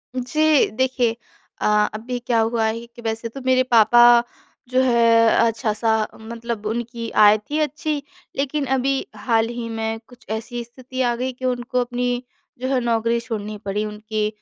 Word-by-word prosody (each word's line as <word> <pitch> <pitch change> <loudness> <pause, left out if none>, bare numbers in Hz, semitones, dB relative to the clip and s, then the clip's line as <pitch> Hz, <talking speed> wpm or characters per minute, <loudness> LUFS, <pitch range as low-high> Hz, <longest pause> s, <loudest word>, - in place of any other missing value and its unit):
जी। 300 +4 +2
देखिए 250 0 0 0.5
अ, - - +1 0.3
अभी 235 +4 -4
क्या 235 -1 0
हुआ 225 0 +1
है 230 +1 -3
कि 235 0 -14
वैसे 225 0 -3
तो 270 +4 -9
मेरे 255 0 +4
पापा 240 0 +6 0.5
जो 255 +1 +3
है 230 -2 +4 0.2
अच्छा-सा 225 -1 0 0.3
मतलब 230 -1 -6
उनकी 230 +1 -3 0.2
आय 210 +1 +7
थी 290 +9 -4
अच्छी, 300 0 -1 0.4
लेकिन 280 +1 -1
अभी 270 +1 0
हाल 225 +1 +1
ही 240 -1 -5
में 225 0 -3
कुछ 245 - -18
ऐसी 235 +2 -4
स्थिति 255 +2 -7
आ 240 -1 +1
गई 255 +2 -2
कि 255 +1 -7
उनको 250 0 -1
अपनी 245 0 -2 0.4
जो 260 - -1
है 260 - +3
नौकरी 230 0 +1
छोड़नी 215 -3 -5
पड़ी 205 +2 -1
उनकी 215 0 -3
235 Hz, 160 wpm, -22 LUFS, 225-255 Hz, 0.5 s, आय